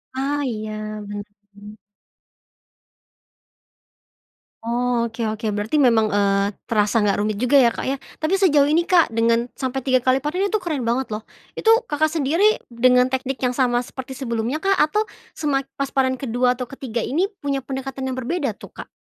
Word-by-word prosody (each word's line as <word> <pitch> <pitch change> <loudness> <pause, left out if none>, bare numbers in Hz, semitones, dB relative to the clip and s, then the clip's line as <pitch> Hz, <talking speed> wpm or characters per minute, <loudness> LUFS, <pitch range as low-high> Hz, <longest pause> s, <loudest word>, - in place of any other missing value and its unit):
Ah, 280 +2 -1
iya 215 -3 -4 0.4
betul. 205 0 -10 2.9
Oh 235 0 0
oke 225 - -16
oke 215 +1 -5
berarti 205 +6 -2
memang, 235 -7 +4
eee, 200 -1 +1 0.2
terasa 210 0 +2
nggak 200 -1 +1
rumit 210 0 0
juga 250 +6 +4
ya 245 - +6
Kak 235 - -2
ya, 270 +1 -2 0.2
tapi 350 +5 0
sejauh 300 -7 +5
ini 315 +4 +2
Kak 345 -7 +4
dengan 230 +1 +1
sampai 265 -1 -2
3 255 -1 +3
kali 260 +2 +1
panen 365 +7 0
itu 435 - -2
keren 290 -9 -2
banget 250 +1 -1
loh. 215 +1 -5 0.2
Itu 450 +2 +3
Kakak 315 -7 +1
sendiri 330 +7 +2
dengan 250 +2 +4
teknik 265 0 -3
yang 250 - +2
sama 245 -1 +1
seperti 260 +1 -8
sebelumnya 240 +3 -3
kah? 390 - +2
Atau 420 +8 +3 0.3
semak 275 -3 -1
pas 275 -1 -3
panen 260 -1 +1
kedua 250 0 0
atau 250 - -4
ketiga 245 -2 -5
ini 345 +8 0 0.2
punya 275 -1 0
pendekatan 265 0 -5
yang 260 - -3
berbeda 265 - -2
tuh - - -13
Kak? - - -10
255 Hz, 165 wpm, -22 LUFS, 230-280 Hz, 2.9 s, ya